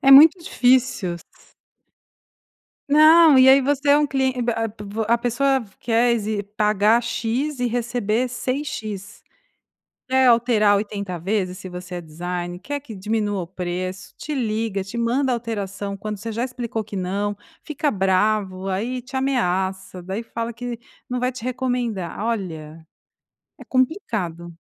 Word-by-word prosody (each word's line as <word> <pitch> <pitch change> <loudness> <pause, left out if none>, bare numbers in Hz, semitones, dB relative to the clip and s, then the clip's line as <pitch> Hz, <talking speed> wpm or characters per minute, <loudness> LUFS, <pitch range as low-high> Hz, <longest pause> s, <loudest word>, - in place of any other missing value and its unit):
é 270 - +4
muito 310 +6 +9
difícil. 250 - +2 1.7
Não, 310 -1 +7
e 260 - +7
aí 275 +1 +7
você 285 +1 +1
é 290 - +6
um 295 - +2
clien 265 -1 +1
b 235 - +1
a 225 -1 -1
p 210 0 -10
p 210 +2 -3
a 235 +1 +4
pessoa 265 +2 +1 0.2
quer 235 +1 +2
exe 215 -2 -1
pagar 210 +2 +3
X, 250 +5 -2
e 245 - +1
receber 240 0 -1
6 260 +4 -2
X. 210 -4 -6 0.9
Quer 260 0 +4
alterar 230 -4 +4
80 200 -4 -4
vezes, 185 0 -1
se 185 - -8
você 180 0 -7
é 175 - -4
designer, 175 +2 -5
quer 285 +7 -4
que 245 -7 -10
diminua 205 0 -1
o 170 - -6
preço. 185 +1 -5
Te 305 - -5
liga, 220 -6 -1
te 215 +4 -7
manda 250 +3 +1
alteração, 205 -4 -4
quando 210 +2 -4
você 225 +3 -6
já 235 +3 -1
explicou 240 -3 -4
que 210 -1 -8
não. 200 +3 -2 0.3
Fica 300 -1 -1
bravo, 195 0 +1
aí 235 +7 -2
te 265 +2 -6
ameaça, 190 -8 -1
daí 190 +6 -4
fala 230 0 -5
que 240 0 -6 0.3
não 250 0 -1
vai 250 - +1
te 255 -2 -8
recomendar 245 -8 -2
olha, 165 -8 -4 0.7
é - - -10
complicado. 200 - -2
225 Hz, 155 wpm, -22 LUFS, 195-255 Hz, 1.7 s, muito